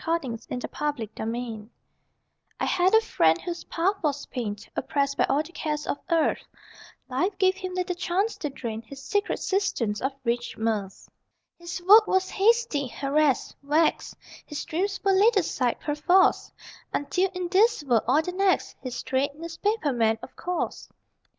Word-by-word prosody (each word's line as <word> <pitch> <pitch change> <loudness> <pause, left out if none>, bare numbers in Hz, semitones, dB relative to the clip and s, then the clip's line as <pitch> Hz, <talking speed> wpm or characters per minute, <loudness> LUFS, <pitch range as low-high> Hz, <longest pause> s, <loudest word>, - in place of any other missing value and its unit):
THOUGHTS 330 -3 0 0.2
ON 250 - -5 0.2
REACHING 230 -7 -5 0.2
LAND 230 -3 -5 0.9
I - - 0
had 370 0 +3
a 445 - +7
friend 165 - +2
whose 345 -1 -6
path 385 +4 0
was 290 -2 -1
pain 225 -5 -4 0.2
Oppressed 280 -1 0
by - - +3
all 285 +3 +1
the 335 - -13
cares 300 -3 -3
of - - -2
earth 330 -2 +2 0.6
Life 360 +10 -1
gave 375 -1 +4
him 370 -1 -6
little 360 -1 -1
chance 375 +5 0
to 295 - -3
drain 230 -5 -5
His 270 +4 -11
secret 410 +6 0
cisterns 265 - -1
of 265 - 0
rich 240 0 -2
mirth. 215 -4 -2 0.5
His 345 +1 -6
work 425 +2 +8
was 375 0 +1
hasty, 430 - +2
harassed, 280 +2 0
vexed: 300 +3 +1 0.3
His 295 - -6
dreams 380 +4 -2
were 395 - +3
laid 415 +4 +5
aside, 260 -9 0
perforce, 355 +6 +2 0.4
Until 365 +6 0
in 365 -1 -2
this 420 0 +3
world, 240 -6 +3
or 310 - +4
the 360 - -3
next.... 380 +1 +1
(His 255 -2 -5
trade? 275 +2 0
Newspaper 335 +1 -1
man, 225 -2 +2
of - - -10
course!) 360 0 -3
315 Hz, 160 wpm, -26 LUFS, 260-375 Hz, 0.9 s, work